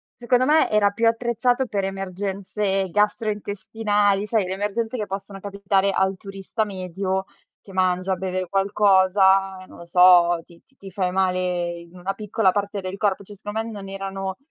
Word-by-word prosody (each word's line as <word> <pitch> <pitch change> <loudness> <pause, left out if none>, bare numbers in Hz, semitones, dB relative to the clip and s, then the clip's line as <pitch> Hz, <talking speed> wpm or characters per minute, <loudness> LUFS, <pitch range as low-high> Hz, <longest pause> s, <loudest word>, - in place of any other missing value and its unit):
secondo 250 +1 +2
me 305 +3 +4
era 210 -1 +3
più 230 +3 +1
attrezzato 240 +2 +1
per 205 -5 -2
emergenze 195 +1 -2
gastrointestinali, 205 0 0
sai, 215 -3 +1
le 185 - -3
emergenze 215 +5 -2
che 210 -3 -3
possono 195 0 -6
capitare 200 0 0
al 190 0 +1
turista 195 +3 -4
medio 190 -1 -3 0.4
che 195 - -14
mangia, 185 0 +1
beve 185 0 -3
qualcosa, 195 0 +3
non - - -15
lo 170 - -10
so, 175 -1 +6
ti 170 -1 -19
ti 270 - -32
ti 195 - -10
fai 185 -1 -1
male 185 -1 +1 0.4
in 170 +1 -15
una 185 +2 -3
piccola 205 -1 +1
parte 205 +1 -2
del 185 0 -5
corpo, 200 -1 0
cioè 205 - -12
secondo 205 +2 -4
me 230 - -7
non 200 -3 -8
erano 195 -1 -5
195 Hz, 165 wpm, -23 LUFS, 190-210 Hz, 0.4 s, so